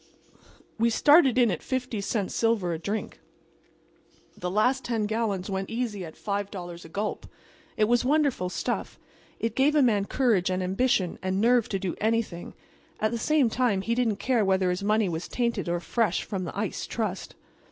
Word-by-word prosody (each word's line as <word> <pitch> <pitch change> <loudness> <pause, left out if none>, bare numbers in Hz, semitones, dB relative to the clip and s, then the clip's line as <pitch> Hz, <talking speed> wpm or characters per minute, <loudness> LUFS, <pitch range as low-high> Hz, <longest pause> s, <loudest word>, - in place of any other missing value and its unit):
We 230 +1 +4
started 280 +2 +5
in 240 -4 +4
at 175 - -3
50 250 -5 -3
cents 200 -1 -2
silver 220 -7 +1
a 160 - -4
drink. 205 +6 -4 1.2
The 180 - -4
last 250 +7 +2
ten 225 -3 -1
gallons 210 -4 -1
went 195 -1 -3
easy 225 -4 -3
at 160 -2 -9
$5 195 -4 -5
a - - -11
gulp. 205 +5 -3 0.5
It 215 - +3
was 240 +3 +3
wonderful 275 -9 +1
stuff. - - -3 0.4
It 230 -1 -1
gave 285 +3 +3
a 295 - +5
man 210 -5 +2
courage 215 -7 +1
and 185 0 -1
ambition 190 -1 +1
and 185 +1 -1
nerve 235 +1 +3
to 195 - -1
do 190 -2 -3
anything; 220 -5 -1 0.4
at 215 - +1
the 235 - -2
same 300 +1 +3
time 230 -4 +1
he 230 - 0
didn't 235 -3 +1
care 245 0 +1
whether 190 -2 +2
his 180 +2 -2
money 210 +1 +2
was 165 -1 -4
tainted 235 -7 -1
or 175 0 0
fresh 210 +1 0
from 190 -3 -4
the 170 - -7
Ice 205 -1 -3
Trust. 210 -5 -4
215 Hz, 180 wpm, -27 LUFS, 190-235 Hz, 1.2 s, started